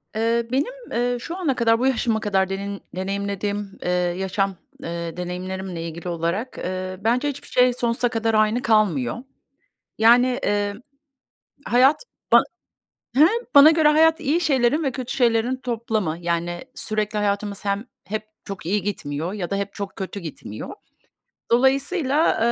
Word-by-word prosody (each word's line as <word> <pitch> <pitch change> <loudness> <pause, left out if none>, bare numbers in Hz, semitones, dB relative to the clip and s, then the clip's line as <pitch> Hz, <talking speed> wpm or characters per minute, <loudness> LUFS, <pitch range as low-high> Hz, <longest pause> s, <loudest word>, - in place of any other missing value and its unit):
Eee, 230 +1 +1
benim, 285 - 0 0.2
eee, 245 +1 0
şu 335 +8 -6
ana 310 -9 0
kadar, 230 -1 +3
bu 255 - +2
yaşıma 230 -4 +1
kadar 195 -3 +1
denin 200 +1 -4
deneyimlediğim, 200 +1 -3
eee, - - -1
yaşam, 185 +2 0 0.3
eee, 170 0 -5
deneyimlerimle 180 -1 -4
ilgili 170 +2 -6
olarak, 170 +9 -2
eee, 185 0 -4
bence 245 +6 +2
hiçbir 280 -1 -7
şey 250 0 +3
sonsuza 240 0 0
kadar 225 -1 0
aynı 215 +3 +3
kalmıyor. 205 - +2 0.8
Yani, 235 +3 +6
emm, 205 -4 -1 0.9
hayat 260 - +4 0.3
ban - - +8 0.7
hem 300 +5 +7 0.3
bana 285 +2 +10
göre 315 -1 +4
hayat 320 +2 +4
iyi 310 +3 +1
şeylerin 280 -2 +2
ve 270 -3 0
kötü 255 -1 -5
şeylerin 240 0 +2
toplamı. 220 -9 -2
Yani, 170 0 -2
sürekli 215 0 -2
hayatımız 205 0 -2
hem 200 +2 -1 0.2
hep 215 +2 -3 0.2
çok 195 -5 -7
iyi 200 +3 +1
gitmiyor 165 -4 -3
ya 195 -4 -4
da 200 - 0
hep 200 0 -3
çok 200 -1 -6
kötü 195 +1 -5
gitmiyor. 150 - -7 0.8
Dolayısıyla, 275 +5 +2
215 Hz, 145 wpm, -23 LUFS, 190-250 Hz, 0.9 s, bana